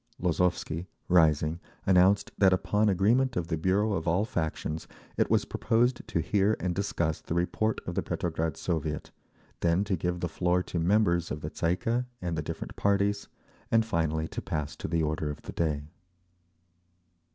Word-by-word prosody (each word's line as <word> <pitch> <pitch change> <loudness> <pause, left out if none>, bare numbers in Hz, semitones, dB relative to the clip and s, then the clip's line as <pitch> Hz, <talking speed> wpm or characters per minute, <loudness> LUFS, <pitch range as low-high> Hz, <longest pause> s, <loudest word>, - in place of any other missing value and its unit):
Lozovsky, 90 -1 0 0.2
rising, 80 -2 +4 0.3
announced 95 +2 +4
that 95 -2 +5
upon 105 +3 +2
agreement 120 +7 +2
of 85 -1 -2
the 80 - +1
bureau 95 +6 +1
of 80 -3 -2
all 90 +6 +2
factions, 80 -4 -3 0.3
it - - +1
was - - +3
proposed 120 +2 +1
to 85 - 0
hear 100 +4 +2
and 90 +1 -1
discuss 85 -4 -1
the 85 - -4
report 105 +5 0
of 90 - -3
the - - 0
Petrograd 80 -3 -2
Soviet, 80 -3 -3 0.5
then 85 +3 +2
to 100 -2 0
give 90 +1 -2
the 85 - -1
floor 90 +2 +1
to 85 - -3
members 85 -1 +2
of 75 - -4
the 75 - -5
Tsay 85 0 +1
ee - - 0
kah 120 +6 -1
and 85 -2 -3
the 75 - -1
different - - -6
parties, 100 0 +1 0.4
and 115 0 +3
finally 80 -6 0
to - - -5
pass 75 -1 -3
to - - -4
the 80 0 0
order 75 0 -1
of 75 - -6
the - - -7
day. 75 -3 0
90 Hz, 175 wpm, -29 LUFS, 80-100 Hz, 0.5 s, that